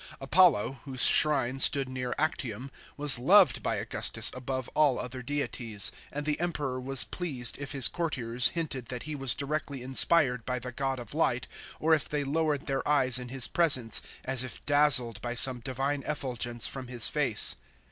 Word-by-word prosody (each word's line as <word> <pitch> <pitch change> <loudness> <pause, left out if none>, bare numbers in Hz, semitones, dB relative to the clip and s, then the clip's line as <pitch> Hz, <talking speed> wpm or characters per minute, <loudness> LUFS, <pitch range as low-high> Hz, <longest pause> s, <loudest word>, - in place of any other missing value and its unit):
J - - -16
Apollo, 135 - +1
whose 130 -3 0
shrine 135 -4 +3
stood 135 0 +5
near 125 -1 -6
Actium, 130 -4 -4 0.3
was 145 -4 +6
loved 180 - +4
by - - -3
Augustus - - -2
above 130 0 -6
all 150 -4 +1
other 125 +1 -7
deities, 125 -6 -2 0.2
and 145 +1 -6
the 150 -1 -3
Emperor 145 -7 -4
was 135 0 +3
pleased 135 -11 -4
if 140 0 -6
his 135 -3 +5
courtiers 125 -8 -1
hinted 150 -8 -6
that 125 -1 -8
he 155 - -7
was 135 -4 -2
directly 140 -2 -5
inspired 130 -1 +3
by 125 +1 -4
the 125 0 -9
<zod 135 0 -4
of 120 -3 -10
light - - -2 0.3
or 160 +1 +1
if 150 -3 -1
they 150 -1 -3
lowered 150 0 -3
their 135 -1 -4
eyes 130 -4 +4
in 125 -1 -9
his 130 -1 +3
presence, 130 -10 +3 0.2
as 130 -1 +2
if 130 -2 -7
dazzled 135 -7 +3
by 120 0 -6
some 125 +1 0
divine 135 +4 -4
effulgence 120 -5 -2
from 130 -2 -3
his 120 -2 +2
face. - - +5
135 Hz, 175 wpm, -27 LUFS, 125-145 Hz, 0.3 s, was